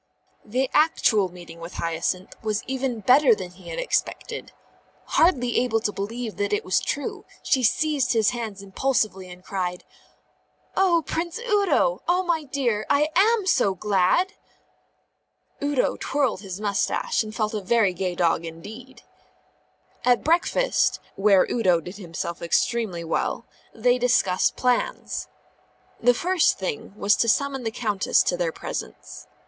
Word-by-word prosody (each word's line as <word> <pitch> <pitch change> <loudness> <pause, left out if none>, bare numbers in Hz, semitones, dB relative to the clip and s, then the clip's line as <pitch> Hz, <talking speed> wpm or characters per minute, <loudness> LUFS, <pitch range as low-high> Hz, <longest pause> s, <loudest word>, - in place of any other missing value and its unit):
The 255 +5 -1
actual 220 - +3
meeting 175 -2 -12
with 170 +2 -9
Hyacinth 170 +3 -2
was 215 -1 -2
even 260 -3 -2
better 255 +3 +5
than 185 -3 -7
he 185 +1 -13
had - - -5
expected. - - -2 0.5
Hardly 250 -8 +2
able 240 -2 +1
to 215 - -1
believe 220 +3 -5
that 205 0 -1
it 205 - -1
was 185 - +2
true, 285 - -4 0.2
she 265 - +2
seized 275 +2 +2
his 220 -2 +3
hands 220 -5 -5
impulsively 200 -3 -1
and 180 0 -12
cried: 180 -2 -3 0.9
"Oh, 350 -4 +3
Prince 340 +3 -3
Udo! 460 +1 +1
oh, 360 +2 +2
my 340 -3 0
dear, 255 -6 -1
I 290 +2 +3
am 430 +2 +4
so 250 - +2
glad!" 210 - +2 1.3
Udo 285 -3 +1
twirled 270 -8 0
his 190 -2 -7
moustache 215 - 0
and 215 -1 -6
felt 215 -1 -1
a 210 - -2
very 205 -1 +2
gay 180 0 -3
dog 170 -2 +1
indeed. 220 +10 -10 1.0
At 245 -1 +3
breakfast 350 +10 +2 0.2
(where 195 -2 +4
Udo 185 -8 +2
did 180 +4 -9
himself 170 -2 -5
extremely 180 +1 0
well) 165 - -2 0.3
they 250 0 +1
discussed 230 -7 +2
plans. 250 -1 -1 0.7
The 245 +1 +4
first 360 +4 +2
thing 190 0 -5
was 205 0 +3
to 230 - +2
summon 280 +2 +1
the - - +1
Countess 215 -3 +1
into - - 0
their - - -1
presence. - - -7
230 Hz, 140 wpm, -24 LUFS, 190-280 Hz, 1.3 s, better